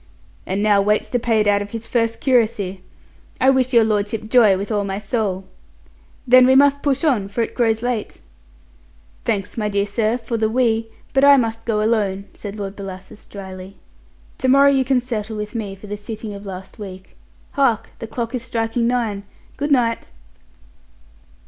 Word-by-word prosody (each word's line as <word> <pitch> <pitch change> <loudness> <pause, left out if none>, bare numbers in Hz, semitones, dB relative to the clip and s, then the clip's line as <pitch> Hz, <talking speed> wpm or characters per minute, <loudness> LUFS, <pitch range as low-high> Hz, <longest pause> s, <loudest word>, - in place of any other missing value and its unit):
"And 195 +2 -1
now 205 -2 +4
waits 210 +1 0
to 245 - +1
pay 225 -2 +2
it 210 - 0
out 205 0 +3
of 205 - -6
his 230 +1 -6
first 230 -1 -1
curacy. 215 -7 +1 0.6
I 265 +1 +5
wish 260 -1 +1
your 235 -3 +5
lordship 215 0 -1
joy 220 -6 +6
with 200 +4 -5
all 205 -1 +1
my 195 -1 -3
soul. 200 -3 -2 0.8
Then, 255 0 +7
we 260 - +5
must 285 +1 +5
push 275 0 0
on, 245 -11 +2
for 205 +4 -1
it - - -5
grows 225 -2 +1
late." 245 -3 -3 1.1
"Thanks, 205 -2 -2
my 210 -2 -1
dear 200 0 0
sir, 215 +3 0
for 230 -1 -4
the 220 -1 +1
'we,' 225 -1 +1 0.3
but 270 - +3
I 280 0 +8
must 225 -2 -1
go 215 -2 0
alone," 205 -3 0
said 205 -1 -8
Lord 200 -1 -5
Bellasis 190 0 -10
dryly. 190 -1 -9 0.6
"To 260 - 0
morrow 275 +2 +6
you 270 -1 +2
can 260 -1 +1
settle 220 -3 -4
with 210 0 -5
me 210 -4 -4
for 195 - -13
the 205 0 -5
sitting 210 0 -7
of 200 0 -9
last 190 +3 -9
week. 190 -2 -10 0.4
Hark! 255 -6 +1
the 225 - -6
clock 230 +1 -4
is 250 - -2
striking 230 0 -1
nine. 230 -5 -1 0.3
Good 290 +1 -3
night." 235 -4 +1
220 Hz, 185 wpm, -20 LUFS, 205-245 Hz, 1.1 s, I